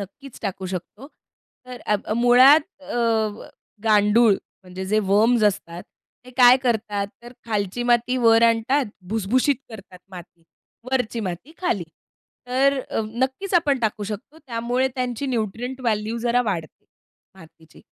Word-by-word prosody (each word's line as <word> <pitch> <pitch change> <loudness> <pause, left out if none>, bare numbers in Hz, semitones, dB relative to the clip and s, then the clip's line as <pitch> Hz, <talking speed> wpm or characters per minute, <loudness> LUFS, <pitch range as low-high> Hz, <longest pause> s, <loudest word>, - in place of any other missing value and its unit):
नक्कीच 230 +7 -10
टाकू 190 -2 -4
शकतो. 205 +8 -7 0.6
तर 250 -1 -9
आ 210 - +2 0.2
मुळात 255 +5 +7 0.2
अ, 275 - -6 0.9
गांडूळ 215 +1 +4 0.3
म्हणजे 185 0 -7
जे 215 - +3
वम्स 220 +3 +4
असतात, 175 -4 -1 0.4
ते 255 - -13
काय 250 0 +8
करतात, 215 -5 -1 0.2
तर 240 +1 -11
खालची 210 0 -2
माती 240 +1 +2
वर 230 -2 +4
आणतात 230 +4 +2 0.2
भुसभुशीत 225 +6 +1
करतात 195 -5 -12
माती. 175 -2 -12 0.5
वरची 250 -3 -1
माती 185 - -7
खाली. 350 - -1 0.6
तर 270 +2 +2
अ, - - -1
नक्कीच 260 - -3
आपण 295 -6 +3
टाकू 215 -2 -1
शकतो. 215 +9 -8
त्यामुळे 245 +2 -1
त्यांची 250 +1 -3
न्यूट्रिएंट 245 +1 -3
व्हॅल्यू 220 -2 -1
जरा 245 +1 +2
वाढते. 165 -5 -6 0.5
मातीची. 165 -2 -18
230 Hz, 130 wpm, -22 LUFS, 205-255 Hz, 0.9 s, काय